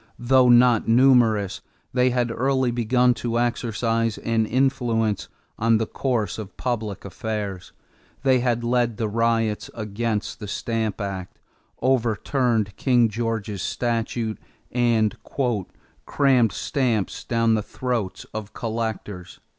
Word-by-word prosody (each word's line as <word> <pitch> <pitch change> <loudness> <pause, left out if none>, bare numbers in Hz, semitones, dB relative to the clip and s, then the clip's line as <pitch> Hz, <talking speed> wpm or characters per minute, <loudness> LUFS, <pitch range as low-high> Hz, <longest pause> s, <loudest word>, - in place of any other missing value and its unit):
Though 125 +1 +4
not 120 -2 +5
numerous, 115 -5 +4 0.3
they 125 0 +3
had 120 -1 0
early 130 +1 +1
begun 125 +1 +3
to 120 -1 -2
exercise 115 -1 0
an 115 -1 0
influence 120 -5 0 0.3
on 115 0 +4
the 110 - 0
course 110 -6 -2
of 105 -3 -8
public 110 -6 -3
affairs. 100 -2 -5 0.5
They 130 -2 +4
had 120 -1 0
led 120 -2 +1
the 110 - -1
riots 115 0 0
against 110 +1 -3
the 105 - -6
Stamp 110 0 -2
Act, 100 -3 -5 0.5
overturned 120 -3 +1
King 120 -3 +3
George's 110 -3 -3
statue, 115 -1 -1 0.4
and 120 -2 +2 0.9
"crammed 130 -6 +3
stamps 115 -2 -1
down 115 -2 +2
the 110 - +1
throats 115 -4 -3
of 105 -1 -6
collectors." 110 -5 -4
115 Hz, 115 wpm, -23 LUFS, 110-125 Hz, 0.9 s, not